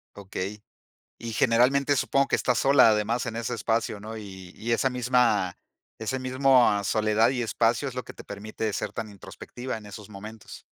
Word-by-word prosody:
Okey. 100 +1 -6 0.6
Y, 115 -1 -6
generalmente, 130 +6 +3
supongo 140 +1 +2
que - - +2
estás 125 -2 +1
sola, 135 -4 +6
además, 110 +3 0
en 115 -1 -4
ese 115 +1 -2
espacio, 115 -2 -1
¿no? 110 +2 -8
Y 95 -3 -10
y 115 +2 -3
esa 130 +3 +2
misma 125 -7 +2 0.4
ese 110 +4 -2
mismo 130 -5 +3
soledad 110 +2 +2
y 125 -2 -1
espacio 115 +3 +1
es 130 - -8
lo 125 - -3
que - - -10
te - - -12
permite 105 +1 -4
ser - - -3
tan 110 - -5
introspectiva 120 +5 -7
en 105 -2 -10
esos 105 +1 -10
momentos. 105 +2 -10
115 Hz, 180 wpm, -26 LUFS, 105-125 Hz, 0.6 s, sola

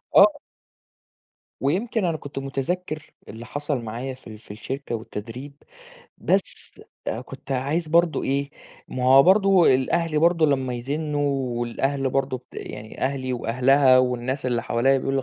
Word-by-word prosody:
آه. - - +6 1.2
ويمكن 195 - 0
أنا 165 -2 0
كنت 140 -2 -7
مُتذكِّر 150 +4 -4
اللي 115 +2 -9
حصل 145 +1 -3
معايا 120 +4 -5
في 130 - -16
ال 110 -1 -10
في 105 - -13
الشركة 125 +5 -5
والتدريب، 115 +5 -7 0.7
بس - - -2 0.3
آآ، 110 - -2
كنت 135 +2 -8
عايز 145 +6 -1
برضه 170 +1 +3
إيه، 140 +1 -1 0.4
ما 125 - -3
هو 135 +2 +8
برضه 190 -3 +5
الأهل 155 +4 0
برضه 165 -1 +4
لمّا 130 -3 0
يزنّوا 140 -1 -2
والأهل 135 +3 -1
برضه 135 -1 -1
ت - - -21
يعني 105 +1 -8
أهلي 130 -1 -1
وأهلها 130 +3 +4
والناس 130 +1 -1
اللي 120 -2 0
حواليّا 135 +4 +2
بيقولوا 135 +1 -1
لي: - - -9
135 Hz, 145 wpm, -24 LUFS, 125-150 Hz, 1.2 s, هو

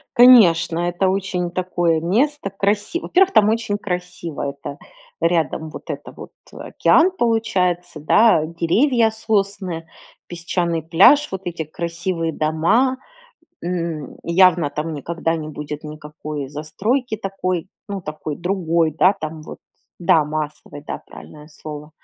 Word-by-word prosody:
Конечно, 185 -10 +6
это 185 +2 0
очень 185 -2 -2
такое 175 -3 0
место 235 - 0
красив 205 - -1
во-первых, 380 +1 +3
там 210 0 +5
очень 220 -2 -1
красиво, 180 -6 -4
это 140 0 -8 0.4
рядом 165 -2 0
вот - - -9
это - - -6
вот - - -11 0.2
океан 355 +3 +2
получается, 180 -7 0
да, 165 0 +4
деревья, 220 - +2
сосны, 195 -6 -2 0.4
песчаный 170 -1 -2
пляж, 195 - +5
вот 190 - -4
эти 170 -2 -3
красивые 165 +1 -3
дома. 170 - +1 0.6
М, 170 -5 -4
явно 170 -3 +4
там 155 +1 -4
никогда 165 +3 -2
не 155 -1 -5
будет 150 0 -7
никакой 150 -2 -7
застройки 215 - -2
такой, 185 -3 -3 0.2
ну, 200 -1 -4
такой 155 -2 -6
другой, 170 -3 0
да, 185 +6 +4
там 155 0 -6
вот, - - -10 0.4
да, 165 -3 +3
массовой, 150 -1 -5
да, - - -6
правильное 150 0 -13
слово, 150 0 -9
170 Hz, 125 wpm, -20 LUFS, 155-200 Hz, 0.6 s, Конечно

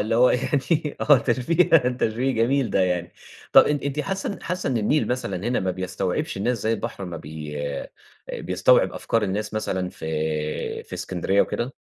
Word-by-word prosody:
اللي 110 +2 0
هُو 125 +1 +6
يعني 145 +4 0
آه 145 -3 +6
تشبيه 165 +9 +2 0.2
تشبيه 125 +1 0
جميل 125 +3 +1
ده - - +2
يعني، 90 -2 0 0.4
طب - - +9
إن 150 - +2
أنتِ 140 +1 -2
حاسّه 195 +4 -3
حاسّه 180 -3 -2
إنّ 125 - 0
النيل 130 +8 +1
مثلًا 125 -6 -2
هنا 125 - +1
ما 95 0 0
بيستوعبش 95 +1 -2
الناس 115 +4 0
زي 110 - +1
البحر 100 - -4
أما 85 -2 -6
بي 75 -1 -7 0.8
بيستوعب - - +3
أفكار 115 -1 -1
الناس 105 +2 -2
مثلًا 95 -4 -1
في 75 -1 -3
في - - -9
إسكندرية 95 +2 0
وكده؟ 125 +3 -3
115 Hz, 165 wpm, -24 LUFS, 95-135 Hz, 0.8 s, طب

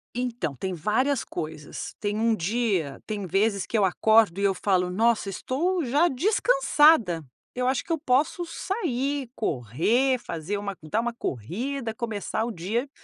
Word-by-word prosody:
Então 240 - -2
tem 190 +6 -3
várias 230 - +1
coisas, 155 -1 -6
tem 205 0 -2
um 225 0 +2
dia 195 - -1
tem 205 -3 -4
vezes 200 +2 +1
que 225 - 0
eu 200 - +4
acordo 215 -1 +4
e - - -1
eu 195 -1 +3
falo 180 -2 +1
nossa 220 +1 +2
estou 325 - -1
já 290 +8 +3
descansada, 305 - +3 0.3
eu 250 0 -1
acho 260 - +1
que 335 - -8
eu 325 - +2
posso 295 +5 +1
sair, 285 - -2
correr, 210 - +1
fazer 175 -2 -4
uma 200 -1 -4
dar 155 +9 -1
uma 240 0 -2
corrida, 225 - -4
começar 220 -2 -3
o 235 - -2
dia 220 +9 -2
225 Hz, 155 wpm, -26 LUFS, 190-260 Hz, 0.3 s, eu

